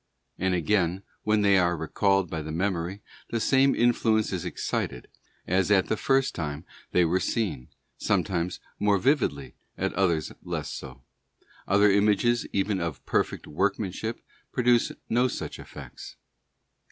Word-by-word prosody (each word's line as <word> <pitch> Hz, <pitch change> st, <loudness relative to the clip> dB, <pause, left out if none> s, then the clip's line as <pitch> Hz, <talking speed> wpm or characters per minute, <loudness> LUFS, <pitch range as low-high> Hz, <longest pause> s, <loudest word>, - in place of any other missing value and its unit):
And 95 Hz, 0 st, +1 dB
again, 90 Hz, +1 st, +1 dB, 0.2 s
when 105 Hz, -1 st, +2 dB
they 100 Hz, -1 st, +5 dB
are 85 Hz, -1 st, +2 dB
recalled 95 Hz, +4 st, +1 dB
by 80 Hz, -1 st, -4 dB
the 80 Hz, +1 st, -6 dB
memory, 95 Hz, +2 st, -2 dB, 0.3 s
the 115 Hz, -, -1 dB
same 135 Hz, +4 st, +4 dB
influence 115 Hz, -3 st, +2 dB
is 90 Hz, -1 st, -3 dB
excited 60 Hz, -7 st, -3 dB, 0.4 s
as 95 Hz, +2 st, +1 dB
at 95 Hz, -3 st, +3 dB
the -, -, +2 dB
first 135 Hz, +4 st, +1 dB
time 75 Hz, -1 st, -4 dB, 0.3 s
they 90 Hz, -, +4 dB
were 90 Hz, +3 st, +2 dB
seen, 100 Hz, -, -2 dB, 0.3 s
sometimes 90 Hz, -1 st, 0 dB, 0.2 s
more 105 Hz, -1 st, +3 dB
vividly, 110 Hz, -, 0 dB, 0.2 s
at -, -, -1 dB
others 85 Hz, -5 st, +1 dB
less -, -, -4 dB
so; 65 Hz, -, -9 dB, 0.6 s
other 100 Hz, +1 st, +5 dB
images 105 Hz, +4 st, +2 dB
even 100 Hz, 0 st, 0 dB
of 85 Hz, -4 st, -2 dB
more -, -, -29 dB
perfect -, -, 0 dB
workmanship 100 Hz, +6 st, -2 dB, 0.3 s
produce 125 Hz, -2 st, +3 dB, 0.2 s
no 120 Hz, +3 st, +3 dB
such -, -, -5 dB
effects. -, -, -10 dB
95 Hz, 140 wpm, -27 LUFS, 85-110 Hz, 0.6 s, they